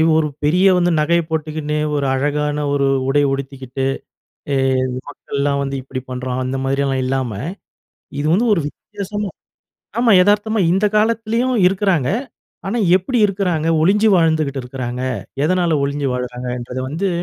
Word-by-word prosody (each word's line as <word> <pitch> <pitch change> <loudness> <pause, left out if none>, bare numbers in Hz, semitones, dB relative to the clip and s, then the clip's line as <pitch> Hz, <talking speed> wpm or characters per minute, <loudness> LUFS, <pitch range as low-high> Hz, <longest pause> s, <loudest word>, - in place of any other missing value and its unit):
இவு 160 +1 +4
ஒரு 155 -1 +1 0.2
பெரிய 180 +6 +3
வந்து 175 0 +2
நகைய 170 +3 +3
போட்டுக்கின்னு, 155 -1 -2 0.2
ஒரு 140 - 0
அழகான 150 +2 -1
ஒரு 140 -1 +2 0.2
உடை 145 +1 +3
உடுத்திக்கிட்டு, 135 -1 -4 0.7
எ - - +1 0.5
மக்கள்லாம் 140 0 -2
வந்து 135 0 -3
இப்படி 130 0 -6
பண்றான். 125 0 -3
அந்த 130 +1 -2
மாரியெல்லாம் 135 0 0
இல்லாம, 130 -3 -1 0.9
இது 150 - -1
வந்து 235 +5 +2
ஒரு 165 - -1
வித்தியாசமா 205 +4 -6 0.7
ஆமா. 235 -1 +3
எதார்த்தமா 210 +2 +2
இந்த 200 +3 +2
காலத்துலயும் 230 +3 +1
இருக்குறாங்க. 185 -7 +1 0.6
ஆனா 215 +5 -1 0.2
எப்பிடி 210 +7 0
இருக்குறாங்க? 185 -5 -1
ஒழிஞ்சி 210 +6 +4
வாழ்ந்துகிட்டு 155 -5 +1
இருக்குறாங்க. 125 -1 -5 0.4
எதனால 170 -1 +2
ஒழிஞ்சி 140 0 -1
வாழுறாங்கன்றத 125 0 -4
வந்து 165 +8 -2
150 Hz, 130 wpm, -19 LUFS, 135-190 Hz, 0.9 s, இவு